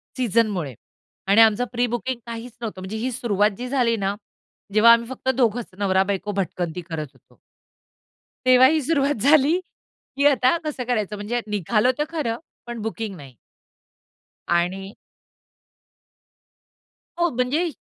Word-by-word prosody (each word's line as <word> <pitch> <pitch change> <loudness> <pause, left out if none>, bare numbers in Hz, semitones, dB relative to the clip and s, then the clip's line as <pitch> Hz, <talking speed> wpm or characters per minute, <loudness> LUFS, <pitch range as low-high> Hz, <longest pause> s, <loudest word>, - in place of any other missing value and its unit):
सीझनमुळे 215 - 0 0.6
आणि 205 +3 +6
आमचं 225 +2 +4
प्री-बुकिंग 245 +1 -2
काहीच 235 +1 -7
नव्हतं. 215 -5 -5
म्हणजे 190 +4 -5
ही 250 +4 -2
सुरुवात 210 -4 +1
जी 250 - -5
झाली 245 -4 +2
ना, 200 0 -1 0.6
जेव्हा 220 +2 +7
आम्ही 235 0 +1
फक्त 260 0 -4
दोघंच 240 -2 +1
नवरा 190 -2 +2
बायको 200 +1 -3
भटकंती 180 -3 -3
करत 155 -2 -4
होतो. - - -27 1.1
तेव्हा 255 0 +7
ही 310 +2 +2
सुरुवात 280 -4 0
झाली 300 +4 +4 0.6
की 280 - +2
आता 265 +1 +3
कसं 295 -4 -3
करायचं, 215 -4 -1
म्हणजे 215 +4 -3
निघालो 210 +4 +1
तर 295 - +1
खरं, 275 -9 -2 0.3
पण 240 -1 -6
बुकिंग 220 -2 -4
नाही. 135 -5 -13 1.1
आणि 185 +3 -1 2.3
हो 345 0 +3
म्हणजे, 280 +8 0
230 Hz, 130 wpm, -23 LUFS, 200-255 Hz, 2.3 s, जेव्हा